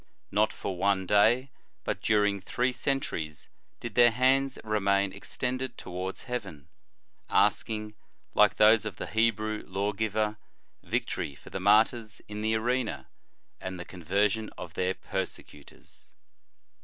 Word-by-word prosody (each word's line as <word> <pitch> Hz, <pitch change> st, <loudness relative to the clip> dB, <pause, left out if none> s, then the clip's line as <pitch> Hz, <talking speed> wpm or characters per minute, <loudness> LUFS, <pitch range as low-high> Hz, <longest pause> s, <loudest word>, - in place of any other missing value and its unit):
Not 105 Hz, +2 st, +3 dB
for 95 Hz, -, -5 dB
one 95 Hz, -1 st, +2 dB
clay, 115 Hz, +7 st, +4 dB, 0.3 s
but -, -, -3 dB
during 105 Hz, -2 st, +2 dB
three 125 Hz, +6 st, 0 dB
centuries 85 Hz, -, -3 dB, 0.3 s
did 120 Hz, -, -6 dB
their 120 Hz, -1 st, +7 dB
hands 130 Hz, +3 st, +2 dB
remain 100 Hz, -2 st, +1 dB
extended 130 Hz, +1 st, -4 dB
towards 90 Hz, +2 st, -5 dB
heaven, 95 Hz, -, -6 dB, 0.6 s
asking, 105 Hz, -1 st, +2 dB, 0.4 s
like -, -, +5 dB
those 110 Hz, +1 st, +6 dB
of 105 Hz, -2 st, -5 dB
the -, -, -5 dB
Hebrew 110 Hz, -1 st, 0 dB
law 100 Hz, +2 st, -1 dB
giver, 105 Hz, 0 st, -1 dB, 0.4 s
victory 70 Hz, -, -2 dB
for -, -, -15 dB
the -, -, -3 dB
martyrs 110 Hz, +3 st, +3 dB
in 105 Hz, 0 st, -6 dB
the 110 Hz, +1 st, +1 dB
arena, 120 Hz, +1 st, -1 dB, 0.5 s
and 95 Hz, -1 st, -6 dB
the 90 Hz, -, -6 dB
conversion 100 Hz, +5 st, 0 dB
of 85 Hz, -, -8 dB
their 95 Hz, +2 st, 0 dB
persecutors. 95 Hz, -6 st, -7 dB
105 Hz, 130 wpm, -29 LUFS, 95-115 Hz, 0.6 s, their